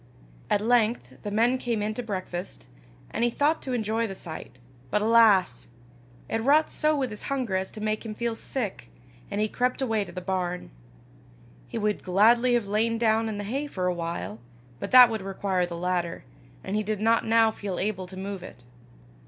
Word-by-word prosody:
At 205 - +2
length 220 - +1
the 205 - -4
men 235 +5 +2
came 230 -4 -1
in 215 +1 -1
to 245 - -4
breakfast, 185 - -5 0.5
and 230 - -1
he 240 - +4
thought 295 +6 +1
to 260 - -4
enjoy 225 0 0
the 195 - -6
sight; 160 -7 -8 0.3
but, 210 - +2
alas! 210 - +4 0.6
it 225 - -1
wrought 295 +6 +4
so 305 0 +2
with 260 -4 -1
his 210 - -6
hunger 255 -8 -1
as 190 0 -2
to 215 - -9
make 215 0 -1
him 220 -2 -6
feel 235 +1 -1
sick, 225 - -4 0.4
and 200 - -3
he 215 - +2
crept 250 +3 -1
away 225 -6 +1
to - - -10
the 185 - -5
barn. 180 -1 -3 1.0
He - - -5
would 210 -1 0
gladly 235 +6 +4
have 235 -3 +1
lain 220 +3 +1
down 225 -1 +2
in 210 - -4
the 205 - -4
hay 270 +8 -3
for 185 -9 -3
a 180 - +2
while, 165 - -4 0.4
but - - -4
that 250 -2 +9
would 220 -2 -2
require 190 -2 -1
the 170 -1 -6
ladder, 175 -1 -2 0.4
and 190 - -3
he 215 - +2
did 215 -1 -2
not 225 +2 +3
now 225 0 +4
feel 200 -4 -5
able 190 -2 -2
to 190 +1 -10
move 195 0 -5
it. 125 -8 -11
215 Hz, 200 wpm, -26 LUFS, 190-230 Hz, 1.0 s, that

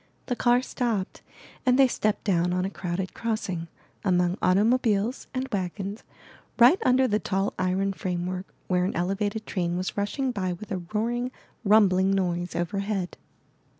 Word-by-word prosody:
The 245 - -1
car 245 +1 +3
stopped 230 -8 -2 0.4
and 255 -1 +4
they 270 -1 +7
stepped 215 -3 -1
down 180 -3 +2
on 180 0 0
a 195 - -3
crowded 180 0 -3
crossing, 200 -7 -3 0.4
among 180 -2 +2
automobiles 215 +4 +2
and 260 0 -2
wagons, 195 +1 -3 0.5
right 250 +10 +7
under 255 +1 +4
the 210 -2 +1
tall 195 0 -1
iron 190 +2 +1
framework 185 0 -3 0.2
where 180 -1 +2
an 185 - -2
elevated 200 +5 -1
train 175 -2 -1
was 185 +1 -3
rushing 255 +6 -1
by 185 -5 -2
with 205 +5 -10
a 185 -2 -2
roaring, 240 +3 0 0.3
rumbling 195 -3 +5
noise 175 -2 -1
overhead. 195 +1 -2
195 Hz, 150 wpm, -26 LUFS, 180-225 Hz, 0.5 s, they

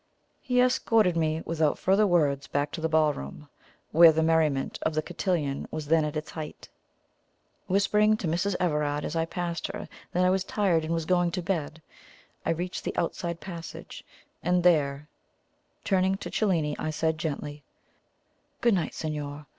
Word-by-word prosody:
He 250 -2 +1
escorted 225 -7 +3
me 160 -1 0
without 160 -2 +1
further 200 +3 +3
words 145 -6 +2
back 145 +1 -1
to 165 - -5
the 160 - 0
ballroom, 150 - 0 0.4
where 165 0 +8
the 160 0 +1
merriment 160 -4 +1
of 160 - -1
the 155 - 0
cotillon 155 -8 -2
was 155 -1 -5
then 160 +1 +3
at 150 0 -2
its 155 - -5
height. 155 -2 -8 1.0
Whispering 210 +3 +3
to 185 - -3
Mrs. 175 +4 0
Everard 150 -4 0
as 155 - -4
I 165 0 +1
passed 170 0 -3
her 195 +2 -6 0.2
that 180 +1 +2
I 180 - +4
was 190 0 +1
tired 190 -5 +1
and 165 +1 -1
was 165 -1 -2
going 175 0 +2
to 180 - -2
bed, 160 -3 -3 0.6
I - - -2
reached 175 +2 -2
the - - -4
outside 170 0 -2
passage, 170 -3 -8 0.4
and 180 0 +1
there, 150 -4 +2 0.8
turning 190 -1 +2
to - - -7
Cellini, 165 -8 +1
I - - -2
said 160 0 -1
gently: 145 -1 -4 1.0
"Good 235 -2 +3
night, 175 -5 -1
signor. 150 -1 -5
165 Hz, 165 wpm, -27 LUFS, 150-180 Hz, 1.0 s, where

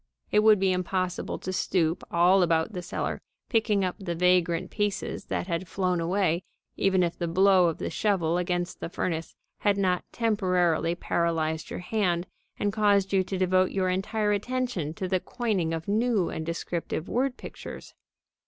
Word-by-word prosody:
It 210 - +5
would 215 -1 +6
be 190 0 +2
impossible 185 0 -2
to 185 - -5
stoop 170 -3 0
all 180 +2 +4
about 165 +3 +2
the 180 - -4
cellar 175 - -3 0.3
picking 215 -4 +2
up 180 - -3
the 175 -4 -3
vagrant 180 0 +2
pieces 205 -2 -2
that - - -2
had 175 0 -3
flown 180 -1 0
away, 175 0 +1 0.3
even 190 -2 +2
if 170 -1 -1
the 170 - -1
blow 185 +1 +5
of 165 - -1
the - - -4
shovel 175 -5 +1
against 175 0 -2
the - - -5
furnace 165 -2 -3 0.2
had 205 -1 +2
not 185 -2 +1
temporarily 180 -7 +1
paralyzed 160 -2 -1
your - - -5
hand 180 -3 0 0.3
and 205 -1 -1
caused 200 -2 +2
you 190 -1 +4
to 190 +1 -4
devote 185 0 +3
your 185 -1 0
entire 210 +3 0
attention 205 - -2
to 185 - -3
the 185 0 +1
coining 205 -8 -1
of 165 0 -4
new 215 -3 +1
and 160 0 -5
descriptive 170 0 -3
word 255 +1 0
pictures. - - -9
185 Hz, 170 wpm, -27 LUFS, 170-200 Hz, 0.3 s, would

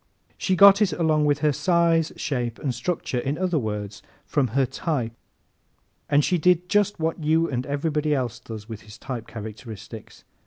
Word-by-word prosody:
She 190 - 0
got 200 +2 +8
it 210 - +3
along 155 -3 +2
with 145 0 +1
her 150 - +4
size, 170 0 +2
shape 120 -6 -3
and 135 -4 -2
structure 125 -1 -2
in 135 +4 -2
other 180 -3 0
words, 105 -3 -4 0.2
from 140 -4 +1
her 135 - +4
type 130 -5 -2 1.0
and 145 0 +4
she 180 - +1
did 180 +1 +2
just 205 -2 +2
what 160 0 -2
you 160 +2 +3
and 125 -3 -3
everybody 150 +1 0
else 125 -3 -2
does 110 -3 -9
with 110 -3 -8
his 105 +1 -13
type 120 -4 -6
characteristics. 110 0 -9
145 Hz, 170 wpm, -24 LUFS, 120-165 Hz, 1.0 s, got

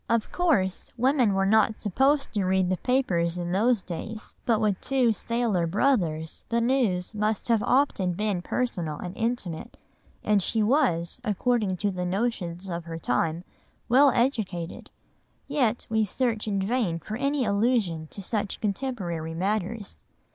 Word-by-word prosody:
Of 230 -1 +1
course 260 - +1
women 250 -4 +3
were 195 0 +2
not 220 +2 +3
supposed 270 +8 +1
to 205 -3 0
read 185 0 +2
the 185 - +1
papers 180 -10 +1
in 175 0 -3
those 220 +3 +2
days, 215 +5 -7
but 225 -3 +3
with 210 -4 0
two 255 -4 +2
sailor 225 -7 0
brothers 165 - 0
the 235 - +1
news 230 -7 +1
must 215 +1 -1
have 230 -2 +3
often 210 -8 +2
been 205 -1 -1
personal 175 -9 -2
and 180 +3 -6
intimate, 225 -8 -3 0.5
and 210 -1 +3
she 220 +4 +1
was, 210 - +1
according 210 -2 0
to 200 +2 0
the 180 -1 -3
notions 185 -2 -2
of 170 -2 -4
her 165 -1 -6
time, 165 +1 -1 0.5
well 275 +4 +6
educated; 220 -10 -1 0.6
yet 260 -5 0
we 220 0 +1
search 225 +1 -1
in 200 -2 0
vain 215 -7 0
for 210 +6 -6
any 275 +1 0
allusion 200 -6 +1
to 200 - -8
such 205 0 -2
contemporary 195 -8 -3
matters. 205 +3 -3
210 Hz, 150 wpm, -26 LUFS, 180-240 Hz, 0.6 s, well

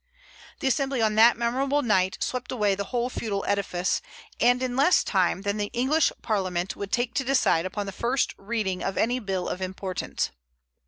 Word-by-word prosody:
The 270 - 0
Assembly 270 0 +1
on 220 -1 +2
that 225 +2 +6
memorable 265 +5 0
night 190 -4 +2
swept 255 -1 -3
away 210 -5 +1
the 200 +1 -3
whole 240 +3 -1
feudal 215 -5 -3
edifice, 190 -3 0 0.4
and 245 +1 +3
in 250 -1 -2
less 285 +7 +4
time 190 -1 +1
than 200 0 -1
the 205 -1 -2
English 275 +6 +2
Parliament 185 -3 -1
would 200 -1 -6
take 240 0 0
to 270 - 0
decide 255 -10 +2
upon 205 +2 -4
the 195 - -5
first 240 +7 0
reading 195 -3 -2
of 195 - -2
any 245 +3 +1
bill 190 -5 -3
of 180 - -4
importance. 185 0 -3
215 Hz, 180 wpm, -26 LUFS, 195-250 Hz, 0.4 s, that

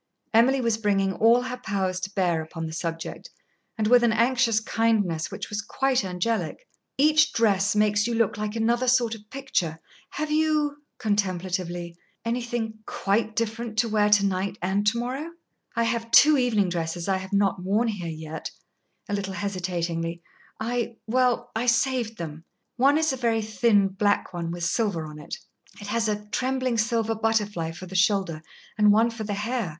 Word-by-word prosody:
Emily 255 +4 +4
was 230 -2 0
bringing 195 -3 +1
all 235 +4 +4
her 250 0 -4
powers 190 -5 -2
to 190 +1 -4
bear 175 -4 +1
upon 165 +1 -6
the 160 - -6
subject, 165 0 -5 0.5
and 215 - 0
with 240 +2 +5
an 235 - +4
anxious 235 0 +3
kindness 215 -8 0
which - - -6
was 210 +1 -2
quite 265 +2 0
angelic. 215 - -2 0.3
"Each 305 +2 +4
dress 200 -3 +2
makes 210 0 +3
you 235 - -1
look 225 -2 +1
like 210 +1 -4
another 235 +3 +1
sort 245 -2 +3
of 210 -1 -11
picture. 185 - -2 0.3
Have 305 0 -3
you," 305 -2 +1 0.2
contemplatively 185 -4 -2 0.3
"anything 235 -2 -2
quite 215 +2 0
different 225 0 -3
to 230 +1 +3
wear 210 -1 +3
to 205 -1 +5
night 195 +1 -1
and 195 +3 0
to 225 +3 +3
morrow?" 265 +7 -4 0.4
"I 230 - +2
have 230 0 -1
two 305 +5 +7
evening 230 -8 +2
dresses 170 0 -3
I 190 -1 +2
have 190 0 -8
not 200 -2 +1
worn 205 +6 +1
here 200 -6 -3
yet" 160 0 -6 0.6
a 205 - -4
little 195 -1 -2
hesitatingly. 175 -3 -3 0.4
"I 235 +1 -2
well 250 +1 +1
I 235 +3 -1
saved 235 -2 +1
them. 160 -1 -7 0.3
One 275 +4 +4
is 315 -3 +1
a - - -4
very 230 -3 +1
thin 210 -2 +3
black 205 0 0
one 170 -1 -3
with 175 0 -5
silver 190 -3 0
on 150 0 -9
it. 150 - -7 0.4
It 205 - -8
has 225 +2 0
a 210 0 -2
trembling 255 -1 0
silver 225 0 +1
butterfly 210 -6 0
for 180 +3 -9
the 185 - -11
shoulder, 190 -4 +1 0.4
and 210 -1 +6
one 225 +3 +4
for 225 -1 -6
the 205 -1 -2
hair." 220 -1 -2
215 Hz, 175 wpm, -25 LUFS, 190-235 Hz, 0.6 s, two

